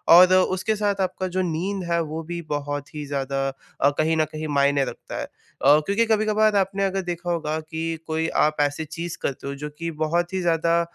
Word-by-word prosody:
और 185 +1 +8
उसके 185 +3 +2
साथ 205 -2 0
आपका 185 0 -1
जो 185 +1 -1
नींद 185 +4 -2
है, 170 - +3
वो 160 0 -4
भी 170 +1 -5
बहुत 145 -1 -4
ही 150 -1 -4
ज़्यादा 135 -1 -1 0.3
अ, 140 - +6
कहीं 160 +1 +2
न 155 - +3
कहीं 155 0 -4
मायने 140 -1 +2
रखता - - -7
है। - - -3
अ, 145 +2 +2
क्योंकि 205 +4 +2
कभी-कभार 215 -1 +3
आपने 195 0 +1
अगर 195 0 0
देखा 175 -1 -4
होगा 160 -2 -1
कि 160 +1 -4
कोई 160 0 0 0.2
आप 155 - -3
ऐसी 145 +2 0
चीज़ 170 +2 -5
करते 140 0 -3
हो, 140 - -3
जो 150 +1 -6
कि 165 0 -2
बहुत 175 +3 0
ही 190 - 0
ज़्यादा 170 0 +2
165 Hz, 210 wpm, -24 LUFS, 150-185 Hz, 0.3 s, और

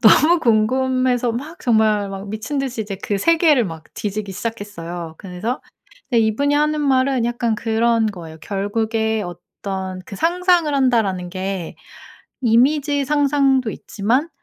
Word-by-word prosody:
너무 305 +9 +6
궁금해서 255 +2 +2
막 295 +9 -6
정말 220 -3 +2
막 195 +1 -7
미친 220 +7 -4
듯이 260 -4 -2
이제 205 -2 -4
그 200 -1 -1
세계를 320 - +4
막 160 -3 -8
뒤지기 205 -1 -4
시작했어요. 175 -7 -6
그래서 195 +7 -4 0.5
예 235 - +6
이분이 225 +7 +2
하는 300 +1 +2
말은 265 -3 +2
약간 240 -1 0
그런 230 0 +1
거예요. 165 -6 -7
결국에 220 +3 -1
어떤 185 +1 -6
그 200 - -8
"상상을 345 - +2
한다."라는 220 -9 +1
게 185 -1 -4 0.6
이미지 275 +4 +3
상상도 275 -4 +2
있지만 235 +10 -1
225 Hz, 290 characters per minute, -20 LUFS, 200-270 Hz, 0.6 s, 너무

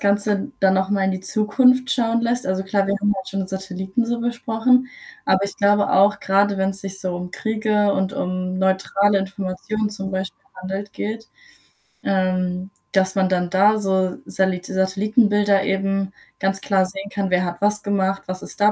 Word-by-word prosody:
Ganze 205 +3 +1
dann 190 -1 +4
noch 190 +1 0
mal 200 -2 +1
in 190 - +2
die 185 - -4
Zukunft 250 +6 +3
schauen 230 -2 +1
lässt, 240 +2 0
also 190 0 -1
klar, 195 +1 +1
wir 200 - +1
haben 205 0 +2
halt 190 -1 -6
schon 195 -1 -3
Satelliten 190 +3 -3
so 235 0 -2
besprochen, 240 +1 +1 0.4
aber 190 +1 +2
ich 200 - -6
glaube 205 0 +3
auch, 200 +2 +4
gerade 200 +1 +2
wenn's 190 0 0
sich 195 -1 -5
so 185 -1 -3
um 180 0 -5
Kriege 215 -1 0
und 190 -1 -1
um 185 0 -3
neutrale 190 +2 +2
Informationen 195 +2 -3
zum 195 -2 -5
Beispiel 190 0 -4 0.2
handelt 195 +2 -5
geht, 225 +2 -5 0.8
ähm, 185 -1 0 0.2
dass 190 -1 +2
man 190 -1 +2
dann 180 -1 0
da 200 +4 +4
so 190 -2 0
Salit 190 -1 0
Satellitenbilder 205 +1 +2
eben 195 0 -1 0.3
ganz 195 0 +1
klar 195 -2 +2
sehen 195 +1 -7
kann, 200 -2 -2
wer 180 0 +2
hat 175 +1 -5
was 210 0 +3
gemacht, 195 -1 0
was 185 0 -5
ist - - -8
da 210 +1 +6
195 Hz, 180 wpm, -21 LUFS, 190-210 Hz, 0.8 s, da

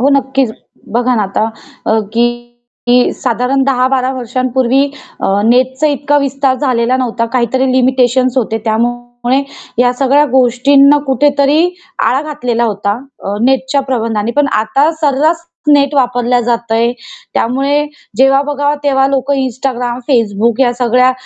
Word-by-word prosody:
हो, 270 - +3
नक्कीच 270 -2 +1 0.5
बघा 245 +1 +1
ना 215 - +1
आता 200 +2 -1 0.4
अ, 220 0 +2
की 235 +1 +3 0.6
की 245 - +5 0.2
साधारण 255 +2 -1
10-12 260 -1 +1
वर्षांपूर्वी 255 +1 0 0.4
अ, - - +1 0.2
नेटचा 260 +5 +2
इतका 290 0 0
विस्तार 275 -1 0
झालेला 255 -2 0
नव्हता, 240 -2 -1
काहीतरी 260 +1 0
लिमिटेशन्स 255 0 +2
होते. 225 -3 0
त्यामुळे 240 +3 -1 0.4
या 245 0 +3
सगळ्या 275 +3 +3
गोष्टींना 275 +3 +4
कुठेतरी 285 +2 +2 0.5
आळा 265 +3 +1
घातलेला 245 -5 -1
होता. 205 0 -2 0.3
अ, 200 +1 -3
नेटच्या 265 +1 +1
प्रतिबंधाने 225 -2 -1
पण 290 - +2 0.2
आता 275 +8 +1
सर्रास 310 +3 +1 0.3
नेट 280 0 +3
वापरला 245 -2 +1
जात 235 -1 -2
आहे. 230 +1 +2 0.4
त्यामुळे 275 +5 0 0.3
जेव्हा 270 +1 +4
बघावं 290 0 -1
तेव्हा 270 -1 +2
लोक 275 0 -1
Instagram, 255 -2 -2
Facebook 230 -1 +1
या 245 - +2
सगळ्या 250 +1 +2
255 Hz, 135 wpm, -13 LUFS, 240-275 Hz, 0.6 s, की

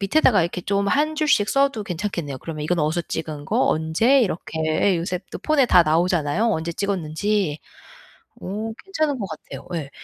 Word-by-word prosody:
밑에다가 205 - +4
이렇게 175 +2 -3
좀 200 +2 0
1 305 +5 +1
줄씩 295 -10 +2
써도 275 -5 +2
괜찮겠네요. 170 -6 -4
그러면 155 0 -6
이건 175 +3 0
어디서 155 +3 +1
찍은 150 -2 -5
거 - - +2
언제 165 - +3
이렇게 170 -6 -2
예 175 +4 +2
요새 180 +2 -2
또 - - -5
폰에 305 -4 +2
다 180 -5 +6
나오잖아요 165 +3 +1
언제 170 -3 -2
찍었는지. 190 -2 -1 0.8
어 215 +4 -4
괜찮은 310 -8 -1
거 200 - -2
같아요. 160 -5 -9
예. 150 -4 -4
180 Hz, 360 characters per minute, -22 LUFS, 160-220 Hz, 0.8 s, 다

